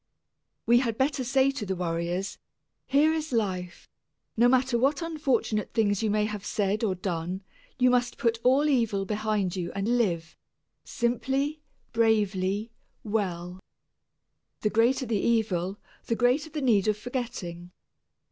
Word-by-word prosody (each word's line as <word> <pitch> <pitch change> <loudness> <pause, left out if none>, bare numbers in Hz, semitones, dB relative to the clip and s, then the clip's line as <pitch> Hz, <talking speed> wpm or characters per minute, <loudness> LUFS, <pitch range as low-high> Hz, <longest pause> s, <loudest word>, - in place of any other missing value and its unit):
We 240 +1 +5
had 230 -4 -1
better 270 0 +1
say 265 +2 +3
to 275 -5 -5
the 190 -2 -2
worriers, 175 +2 -2 0.5
"Here 295 +4 +4
is 315 -2 -3
life; 185 -6 -2 0.5
no 235 +2 +5
matter 260 0 +3
what 280 +5 +2
unfortunate 275 -9 -1
things 205 -3 +2
you 220 - +1
may 210 0 +2
have 210 -2 -5
said 205 +2 -1
or 195 -4 +1
done, 180 0 -3 0.3
you 250 -1 +4
must 245 -1 +1
put 230 -4 +1
all 270 +4 +4
evil 230 -8 +1
behind 210 -3 -1
you 175 -2 -3
and 220 +5 0
live 170 -7 -1 0.5
simply, 270 +5 -1 0.3
bravely, 210 -2 +1 0.3
well." 185 -4 -2 1.0
The 210 - +1
greater 240 +4 +3
the 225 -3 0
evil, 200 -5 0 0.3
the 230 - +1
greater 250 +7 +2
the 300 -2 -4
need 215 -6 +3
of 210 -1 +2
forgetting. 205 -8 -5
220 Hz, 140 wpm, -27 LUFS, 195-255 Hz, 1.0 s, We